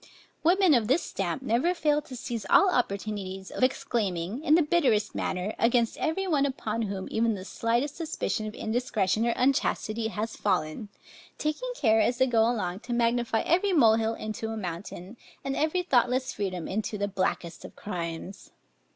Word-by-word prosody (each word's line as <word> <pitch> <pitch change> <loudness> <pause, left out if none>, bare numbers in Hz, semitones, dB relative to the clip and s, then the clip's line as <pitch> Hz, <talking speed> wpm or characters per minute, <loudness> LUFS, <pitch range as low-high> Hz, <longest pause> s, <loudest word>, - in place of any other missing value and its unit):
Women 360 0 +5
of 235 -5 +3
this 280 +8 +2
stamp 195 +6 -3
never 265 +9 +1
fail 300 -3 +2
to 265 -3 -10
seize 235 -2 -4
all 390 -1 +6
opportunities 200 -4 -2
of - - -3
exclaiming, 230 - -1
in 310 - +5
the 335 - +5
bitterest 280 -10 +2
manner, 185 +4 -2
against 230 0 +2
every 350 +5 0
one 305 -7 +2
upon 230 -4 -3
whom 195 -3 -3
even 225 0 +1
the 185 -1 -8
slightest 240 +8 -1
suspicion 305 -9 -2
of 215 - -7
indiscretion 220 -2 0
or 235 - +2
unchastity 230 -4 +1
has 220 +1 -4
fallen; 185 +1 -1 0.5
taking 305 +12 -2
care, 220 - +3
as 245 +2 +1
they 260 - +4
go 235 -3 +2
along, 190 -6 -2
to 245 +2 -5
magnify 235 -1 +1
every 370 +4 +2
mole 225 -9 +6
hill 225 0 0
into 215 +1 -5
a 225 - -4
mountain, 180 +2 -6 0.3
and 270 0 -2
every 320 +4 +1
thoughtless 255 -4 +2
freedom 185 -4 -3
into 210 +2 -2
the 205 0 -1
blackest 185 -3 -2
of - - -11
crimes. 175 -1 -6
230 Hz, 170 wpm, -28 LUFS, 205-270 Hz, 0.5 s, all